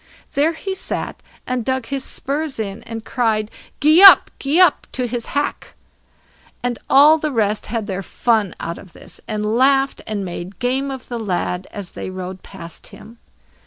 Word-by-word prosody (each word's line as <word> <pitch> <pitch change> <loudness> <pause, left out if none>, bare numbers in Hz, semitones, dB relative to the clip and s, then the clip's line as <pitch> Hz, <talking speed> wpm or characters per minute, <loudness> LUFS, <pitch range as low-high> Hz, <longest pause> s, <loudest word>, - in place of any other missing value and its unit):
There 300 +4 +2
he 385 +4 -5
sat 380 - -4 0.2
and 250 -2 -2
dug 260 0 -1
his 275 +1 -3
spurs 285 +1 -3
in, 205 -2 -4
and 225 -1 -7
cried, 220 -3 0 0.3
"Gee 310 +4 +5
up, 395 - +9
gee 285 +5 +1
up!" 360 -5 +4
to 255 - -1
his 240 -1 -4
hack. 290 - -3 0.9
And 245 -1 -2
all 300 +4 +7
the 305 0 -2
rest 215 -4 0
had 225 -1 -3
their 195 -2 -4
fun 215 0 0
out 170 +1 -5
of 185 - -15
this, - - -13
and 210 -1 -2
laughed, 270 +2 +3
and 205 -3 -3
made 175 +2 -7
game 260 +2 -1
of 265 -2 -7
the 240 -1 -4
lad 185 -3 -2
as 200 -4 -8
they - - -6
rode 185 0 -7
past 170 -4 -11
him. 230 +2 -14
235 Hz, 175 wpm, -20 LUFS, 205-275 Hz, 0.9 s, up